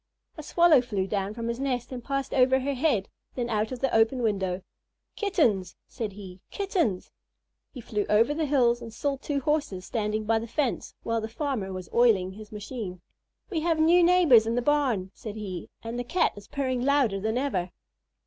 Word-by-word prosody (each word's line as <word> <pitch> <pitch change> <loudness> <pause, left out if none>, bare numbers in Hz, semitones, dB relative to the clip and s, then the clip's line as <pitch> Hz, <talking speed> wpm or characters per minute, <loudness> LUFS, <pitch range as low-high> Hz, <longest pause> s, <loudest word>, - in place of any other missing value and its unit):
A 310 - -7
Swallow 320 -2 +5
flew 205 -6 -2
down 200 +1 -2
from 230 -1 -4
his 235 +1 -3
nest 255 -3 -2
and 250 -2 -6
passed 275 0 -2
over 260 0 +4
her 280 +2 -1
head, 255 -8 +1 0.3
then 240 -2 -2
out 215 +1 0
of 255 - -6
the 270 - 0
open 225 +3 +3
window. 190 -4 -1 0.5
"Kittens!" 245 - +1
said 220 -5 -5
he. 190 -2 -11
"Kittens!" 350 - -1 0.6
He 255 - -9
flew 210 -2 -2
over 230 +7 +4
the 310 0 -1
fields 245 -4 +3
and 230 -1 -8
saw 275 +4 -2
two 280 0 -2
Horses 285 -11 -1
standing 215 -1 -2
by 225 +1 +2
the 230 - -6
fence 260 +1 -2
while 230 0 -1
the 220 - -5
farmer 235 -6 -3
was 185 -2 -6
oiling 215 -6 +4
his 210 +2 -11
machine. 210 -3 -6 0.5
"We 335 - 0
have 325 0 +1
new 335 +3 +5
neighbors 335 -11 +6
in 230 - 0
the 245 - +1
barn," 250 -10 +1
said 215 -2 -8
he, 190 -5 -6
"and 230 +1 -4
the - - -1
Cat 345 +9 +1
is 205 0 -12
purring 260 -3 -2
louder 265 -8 +2
than 220 +4 -1
ever." 195 -10 -1
235 Hz, 195 wpm, -27 LUFS, 210-280 Hz, 0.6 s, neighbors